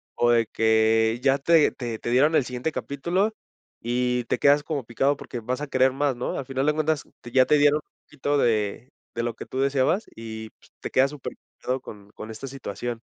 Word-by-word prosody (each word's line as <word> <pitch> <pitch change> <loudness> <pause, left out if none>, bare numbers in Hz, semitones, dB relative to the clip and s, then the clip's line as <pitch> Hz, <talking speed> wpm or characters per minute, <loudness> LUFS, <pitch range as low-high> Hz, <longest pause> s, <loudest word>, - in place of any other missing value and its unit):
o 120 - +2
de 115 -2 +3
que 110 +1 +2
ya 135 0 +4
te 160 +2 +4
te 120 -3 -5
te - - -4
dieron 145 +6 +4
el 130 - +3
siguiente 125 +5 -3
capítulo 175 +10 -1 0.5
y 125 +1 0
te - - 0
quedas 145 +1 +4
como 145 -6 -3
picado 135 +5 +1
porque 120 - -7
vas 125 +4 -3
a 150 - -3
querer 130 -1 +3
más, 140 -1 0
¿no?, 120 - -3
al 135 - -4
final 135 +1 -2
de 150 - +3
cuentas 155 -2 0 0.2
te 120 - -10
ya 130 0 +5
te 150 - +4
dieron 145 +1 +4
un - - -56
poquito 145 0 -1
de 110 0 0 0.3
de 115 - -1
lo 120 -1 -2
que - - -8
tú 130 - -5
deseabas 140 - +1
y 110 -1 -7 0.3
te - - -4
quedas 135 +2 +3
superpegado 130 -1 -6
con 105 -4 -12
con 110 - -8
esta 110 +5 -7
situación. 120 -2 -5
130 Hz, 210 wpm, -25 LUFS, 115-145 Hz, 0.5 s, ya